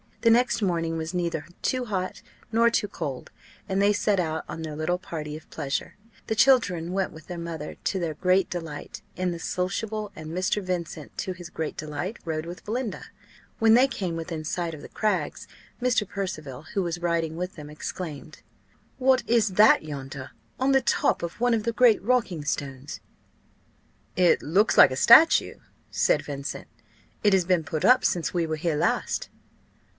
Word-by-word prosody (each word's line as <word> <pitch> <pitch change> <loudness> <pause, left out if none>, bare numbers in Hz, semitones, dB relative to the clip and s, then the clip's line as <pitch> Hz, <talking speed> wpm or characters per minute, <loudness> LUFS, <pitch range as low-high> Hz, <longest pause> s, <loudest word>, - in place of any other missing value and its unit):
The 230 - +5
next 240 -1 +3
morning 165 -3 0
was 160 +2 -4
neither 170 -3 -2 0.2
too 255 -1 0
hot 185 -4 -3 0.3
nor 230 +1 +4
too 210 - +1
cold, 135 -9 -6 0.4
and 190 0 0
they 205 +1 +4
set 205 -1 +1
out 160 -2 -1
on 165 - -5
their 155 -2 -5
little 155 +4 0
party 155 -4 -6
of 155 - -16
pleasure; 145 -3 -3 0.3
the 220 - -1
children 200 -10 +3
went 190 0 -1
with 160 -1 -13
their 175 -1 -6
mother, 165 -3 -6
to 190 - 0
their 165 -3 -2
great 185 +4 +2
delight, 165 -4 -6
in 180 0 -1
the 170 - -5
sociable; 205 +5 -3
and 155 0 -8
Mr. 185 +5 0
Vincent, 175 -5 -5
to 185 - -2
his 175 -1 -10
great 160 -2 -4
delight, 155 +8 -4
rode 160 -1 -3
with 175 0 -8
Belinda. 225 -1 -3 0.5
When 225 -1 +5
they 250 +3 +6
came 185 -10 -3
within 165 -1 -5
sight 170 +1 -2
of 145 - -11
the - - -10
Crags, 215 -1 -1 0.3
Mr. 245 -4 +2
Percival, 155 -10 -5
who 195 - +1
was 170 0 -3
riding 165 -2 0
with 180 +2 -4
them, 150 -2 -9
exclaimed 155 0 -7 0.6
"What 260 0 +3
is 230 -3 +3
that 210 0 +5
yonder, 135 -3 -7 0.3
on 265 +1 +2
the 270 0 +5
top 245 - +1
of 170 +5 -5
one 245 0 +3
of 220 - -2
the 230 +1 -1
great 225 -1 +5
rocking 200 -9 0
stones?" 135 -1 -4 1.2
"It 180 -1 +4
looks 200 +8 +2
like - - +9
a - - -2
statue," 320 - +6 0.4
said - - +2
Vincent. 140 -1 -5 0.6
"It 205 -1 +4
has 185 -2 +3
been 180 -2 +2
put 155 +1 -2
up 255 +1 +6
since 170 -3 0
we 170 -2 0
were 160 - -1
here 155 0 -1
last." - - 0
175 Hz, 180 wpm, -26 LUFS, 160-210 Hz, 1.2 s, like